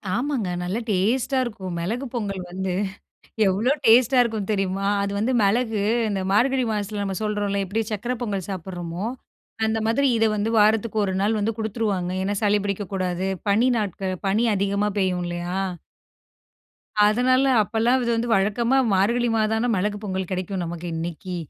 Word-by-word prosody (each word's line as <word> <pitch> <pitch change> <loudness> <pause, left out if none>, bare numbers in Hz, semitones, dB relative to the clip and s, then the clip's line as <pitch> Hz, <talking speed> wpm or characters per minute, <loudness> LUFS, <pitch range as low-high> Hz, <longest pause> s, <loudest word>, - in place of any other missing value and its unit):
ஆமங்க! 245 -6 -1
நல்லா 185 +6 -2
டேஸ்ட்டா 230 +7 +1
இருக்கும். 205 -7 -5
மிளகு 225 +10 -2
பொங்கல் 200 -5 -3
வந்து 190 0 -2 0.7
எவ்ளோ 210 +8 +2
டேஸ்ட்டா 245 +3 +6
இருக்கும் 220 -4 -2
தெரியுமா? 195 -1 -1 0.2
அது 200 0 -2
வந்து 225 +5 +1
மிளகு. 220 +1 +1 0.3
இந்த 195 -2 -1
மார்கழி 255 +5 +3
மாசத்தில 205 -1 -2
நம்ம 195 -1 -3
சொல்றோம்ல்ல 205 -2 -1
எப்படி 215 +4 -1
சக்கர 240 +4 -2
பொங்கல் 200 -4 -3
சாப்பிடறோமோ, 175 -1 -5 0.6
அந்த 220 0 0
மாதிரி 255 +5 +2
இத 225 - +3
வந்து 210 +2 0
வாரத்துக்கு 215 +1 +3
1 190 - -1
நாள் 215 +2 +1
வந்து 215 +2 0
குடுத்துருவாங்க. 205 -5 -1
ஏன்னா 200 +2 -1
சளி 210 0 +3
பிடிக்கக்கூடாது. 190 -2 -2 0.2
பனி 225 +5 +4
நாட்கள் 195 -2 -2
பனி 205 +4 +2
அதிகமா 200 +1 0
பெய்யும் 185 -2 0
இல்லையா? 175 +2 -3 1.5
அதனால 255 +4 +3 0.2
அப்பல்லாம் 235 +5 +1
இத 235 - -1
வந்து 230 +1 -1
வழக்கமா, 230 +6 +2 0.2
மார்கழி 235 +6 +2
மாதம்னா 220 +2 +1
மிளகு 205 +2 -1
பொங்கல் 190 -2 -3
கெடைக்கும் 185 0 -2
நமக்கு 170 +1 -6
இன்னைக்கு. 170 +2 -5
205 Hz, 150 wpm, -23 LUFS, 190-225 Hz, 1.5 s, டேஸ்ட்டா